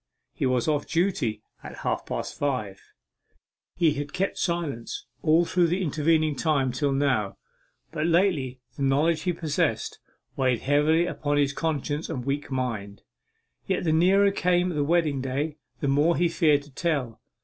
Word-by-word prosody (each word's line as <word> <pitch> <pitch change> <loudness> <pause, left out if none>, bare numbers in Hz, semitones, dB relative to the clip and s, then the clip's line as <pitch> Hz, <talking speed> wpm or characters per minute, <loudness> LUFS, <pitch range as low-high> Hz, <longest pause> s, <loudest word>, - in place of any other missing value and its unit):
He - - -1
was 125 0 +1
off 150 -2 0
duty 155 - 0 0.2
at - - -9
half - - -1
past - - -4
five. 110 -9 -2 0.9
He 165 -4 +3
has 145 0 -4
kept 190 +5 -2
silence 165 -9 -3 0.2
all 165 +2 +4
through 175 0 +2
the 180 +3 0
intervening 155 -1 +1
time 140 -3 +1
till 140 +3 0
now, 135 -8 0 0.5
but 155 +2 -1
lately 165 -8 +1 0.2
the - - -6
knowledge 150 +4 +2
he 180 - 0
possessed 160 -3 -1 0.4
weighed 130 -3 +1
heavily 150 +4 +3
upon 145 -4 -1
his 145 -1 +2
conscience 150 0 -2
and 125 -2 -4
weak 140 +1 -2
mind. 115 -7 -4 0.6
Yet - - 0
the 160 -2 +1
nearer 195 +5 +4
came 180 -1 +1
the 150 -4 0
wedding 155 -3 +1
day, 140 +4 -2 0.2
the 140 - 0
more 145 +5 +3
he 175 0 +2
feared 150 -4 +3
to 145 - -17
tell. 130 -7 -2
145 Hz, 160 wpm, -26 LUFS, 135-170 Hz, 0.9 s, all